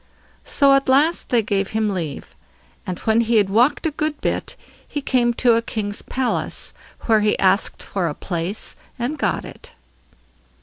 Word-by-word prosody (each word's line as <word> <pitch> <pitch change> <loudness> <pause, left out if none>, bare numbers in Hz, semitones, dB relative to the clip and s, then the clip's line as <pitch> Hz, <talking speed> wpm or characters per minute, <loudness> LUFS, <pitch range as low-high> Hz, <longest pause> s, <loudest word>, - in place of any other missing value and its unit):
So 280 -1 +4
at 275 -1 +2
last 295 +6 +3
they 235 -3 +3
gave 200 -2 -1
him 220 -1 +1
leave. 165 -7 -5 0.5
And 180 -1 -3
when 220 +1 +3
he 230 0 +1
had 200 -3 +3
walked 245 - +3
a 320 - +1
good 305 0 -2
bit, - - -2 0.3
he 290 - -4
came 250 -3 +2
to 240 -1 +4
a 230 - +2
king's 205 -3 -3
palace, 260 -1 -2 0.3
where 220 -2 +3
he 210 0 +2
asked 195 +2 +2
for 185 -4 -2
a 150 - -3
place, 180 +3 -3 0.2
and 245 +6 -2
got - - -1
it. - - -12
225 Hz, 170 wpm, -21 LUFS, 200-260 Hz, 0.5 s, So